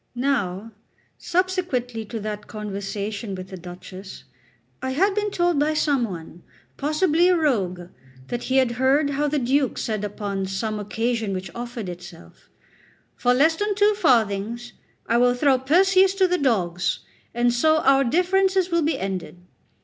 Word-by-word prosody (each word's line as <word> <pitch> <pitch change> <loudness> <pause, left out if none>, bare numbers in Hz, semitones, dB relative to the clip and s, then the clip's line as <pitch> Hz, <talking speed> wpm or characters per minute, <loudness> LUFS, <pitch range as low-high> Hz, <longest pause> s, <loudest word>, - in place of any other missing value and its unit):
Now, 230 -6 -1 0.5
subsequently 340 - -1
to 225 +2 -5
that 210 0 -5
conversation 205 0 -5
with 185 0 -8
the 190 - -7
Duchess, 185 +2 -10 0.6
I 260 0 -2
had 385 +8 +2
been 420 +1 -1
told 350 -5 +1
by 305 +1 +1
some 285 -5 +2
one, 170 -4 -8 0.3
possibly 310 +4 +2
a 360 - +4
rogue, 200 - 0 0.5
that 240 0 -3
he 265 - +1
had 260 -3 +3
heard 270 +4 +2
how 290 +2 0
the 295 +1 0
Duke 270 +1 +1
said 215 -2 -2
upon 200 -2 -3
some 210 +3 -3
occasion 225 0 -2
which 185 0 -5
offered 240 -3 -6
itself: 175 -1 -11 0.7
"For 245 0 +2
less 315 +5 +4
than 415 0 -1
two 415 +1 +4
farthings 235 - +1 0.3
I 235 - +2
will 245 0 +4
throw 265 0 +3
Perseus 370 +7 +4
to 380 -1 +3
the 360 0 0
dogs, 180 -9 0 0.3
and 240 0 +2
so 315 +6 +3
our 275 0 +4
differences 370 +6 +2
will 340 0 +2
be 310 -2 0
ended." 185 -6 -4
245 Hz, 155 wpm, -23 LUFS, 205-310 Hz, 0.7 s, a